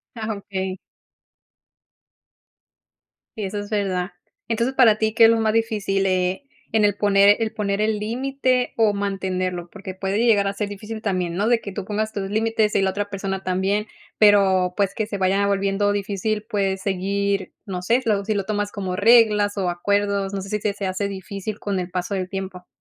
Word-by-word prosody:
Ah, 220 -2 -3
okey. 190 -1 -4 2.6
Sí, 215 - -3
eso 205 +2 -4
es 205 - -7
verdad. 190 -3 -1 0.3
Entonces, 235 +3 0
para 225 -5 +6
ti, 220 0 0
¿qué 225 0 +7
es - - +7
lo 230 0 +3
más 220 -1 +1
difícil 210 -4 0
eh, 185 +6 0 0.3
en 220 -1 +2
el 205 -1 +2
poner 200 0 +5
el 225 -1 -1
poner 205 -2 -1
el 215 -1 +1
límite 255 +3 0
o 220 -2 +4
mantenerlo? 185 -3 -2
Porque 195 -2 -8
puede 190 +1 -2
llegar 215 -4 +3
a 195 - -1
ser 205 0 -3
difícil 215 +2 -7
también, 180 -4 -1
¿no? 205 +4 0
De 235 -1 +3
que 200 - -6
tú 190 0 -5
pongas 215 +1 -2
tus 195 -2 -4
límites 220 0 +1
y - - +2
la 190 - +2
otra 205 +1 -3
persona 195 -1 -3
también, 190 +3 0 0.3
pero, 190 -3 +4
pues, 200 -1 0
que 220 - -1
se 205 -2 -5
vaya 195 +2 +2
volviendo 200 0 +1
difícil, 205 +1 -2
puedes 195 -2 0
seguir, 200 +1 -1
no 180 -2 -4
sé, 235 +7 +2
lo 205 -3 +1
sí 215 - 0
lo 200 -2 -2
tomas 205 -1 -2
como 190 -3 -4
reglas 210 -1 +5
o 185 -2 0
acuerdos, 200 +2 0
no 195 - -2
sé 195 - -8
si 210 - -1
se 205 -1 -1
se 200 -1 -4
hace 185 +2 -2
difícil 200 +2 -6
con 200 -2 -2
el 180 0 -5
paso 180 +2 -2
del 185 -1 -3
tiempo. 190 -2 -6
200 Hz, 195 wpm, -22 LUFS, 190-215 Hz, 2.6 s, qué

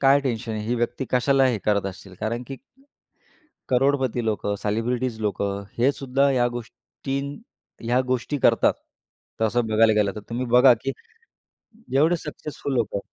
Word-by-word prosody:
काय 140 +1 +5
टेन्शन 120 -3 -3
आहे? 110 -1 -3
ही 120 - 0
व्यक्ती 120 +3 -2
कशाला 135 +2 +3
हे 120 -4 +1
करत 100 -2 +1
असतील? 95 0 -9
कारण 115 +3 -2
की, 135 - -6 1.1
करोडपती 130 -2 +1
लोकं, 105 -2 -1
सेलिब्रिटीज 115 +2 -1
लोकं, 100 -1 -2
हे 125 +4 +4
सुद्धा 140 0 +1
या 125 -2 +2
गोष्टीं 125 +4 -6 0.5
ह्या 120 +2 +2
गोष्टी 130 +3 -1
करतात. - - +4 0.7
तसं 115 +1 +2
बघायला 110 0 +4
गेलं 105 -2 +2
तर 105 - -6
तुम्ही 120 +2 -2
बघा, 125 +1 +6
की 135 +4 -3 1.0
जेवढे 155 +6 +4
सक्सेसफुल 150 -3 -6
लोकं 110 -4 0
120 Hz, 145 wpm, -24 LUFS, 110-135 Hz, 1.1 s, बघा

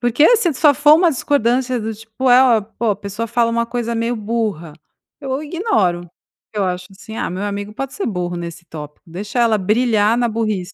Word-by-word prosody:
porque 250 - +4
se 360 -7 +1
só 295 +2 +5
for 295 +2 +6
uma 340 +1 +4
discordância 255 -2 0
do 220 +1 -3
tipo: 225 +4 -2
"É, 245 +1 +7
ó, 240 -4 +4
pô", 220 +2 -2
a - - -6
pessoa 205 +3 -5
fala 235 0 +1
uma 235 0 0
coisa 235 0 -3
meio 230 +1 -1
burra, 210 -7 -3 0.5
eu 270 0 -3
ignoro. 290 - 0 0.4
Eu 210 -2 -1
acho 180 0 -3
assim: 220 +3 -10
"Ah, - - -2
meu 185 +3 -4
amigo 205 0 -4
pode 270 +3 -5
ser 400 - -3
burro 180 -4 -3
nesse 170 0 -7
tópico, 150 -2 -10
deixa 205 +8 -3
ela 225 -2 +3
brilhar 215 +2 +2
na 240 0 +1
burrice.". 215 -4 -2
225 Hz, 200 wpm, -19 LUFS, 200-250 Hz, 0.5 s, É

